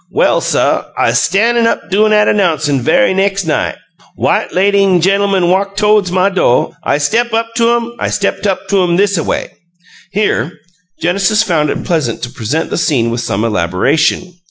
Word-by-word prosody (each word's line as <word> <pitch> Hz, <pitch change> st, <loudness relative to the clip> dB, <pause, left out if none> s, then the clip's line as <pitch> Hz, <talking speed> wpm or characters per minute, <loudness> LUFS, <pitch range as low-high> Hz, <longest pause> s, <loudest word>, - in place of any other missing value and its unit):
Well, -, -, +1 dB
suh, -, -, 0 dB
I'z -, -, +2 dB
stan' 230 Hz, +5 st, +2 dB
up 230 Hz, -, -3 dB
doin' 215 Hz, +3 st, +2 dB
'at 210 Hz, 0 st, +3 dB
'nouncin' 155 Hz, -8 st, 0 dB
ve'y 260 Hz, -, +2 dB
nex' 195 Hz, 0 st, 0 dB
night. 155 Hz, -, -1 dB, 0.4 s
White -, -, 0 dB
lady 200 Hz, +2 st, +2 dB
an' 185 Hz, -2 st, +3 dB
ge'lmun 195 Hz, 0 st, +1 dB
walk 195 Hz, +1 st, 0 dB
todes 210 Hz, -3 st, +2 dB
my 185 Hz, +1 st, +2 dB
do', 180 Hz, -10 st, +1 dB
I -, -, 0 dB
step 225 Hz, +11 st, 0 dB
up 230 Hz, 0 st, -2 dB
to 235 Hz, 0 st, +3 dB
'em 235 Hz, 0 st, -3 dB
I -, -, -1 dB
step 200 Hz, -1 st, -2 dB
up 190 Hz, 0 st, -2 dB
to 200 Hz, -2 st, +2 dB
'em 175 Hz, -1 st, +1 dB
thisaway." 200 Hz, -4 st, -1 dB, 0.6 s
Here 185 Hz, -, -1 dB, 0.5 s
Genesis 200 Hz, +5 st, +1 dB
found 165 Hz, -7 st, 0 dB
it -, -, -4 dB
pleasant 150 Hz, -11 st, -2 dB
to 120 Hz, -, -4 dB
present 120 Hz, +9 st, -3 dB
the -, -, -1 dB
scene 120 Hz, -8 st, 0 dB
with 120 Hz, 0 st, -2 dB
some 105 Hz, -2 st, -2 dB
elaboration. 115 Hz, -, 0 dB
190 Hz, 175 wpm, -13 LUFS, 155-205 Hz, 0.6 s, at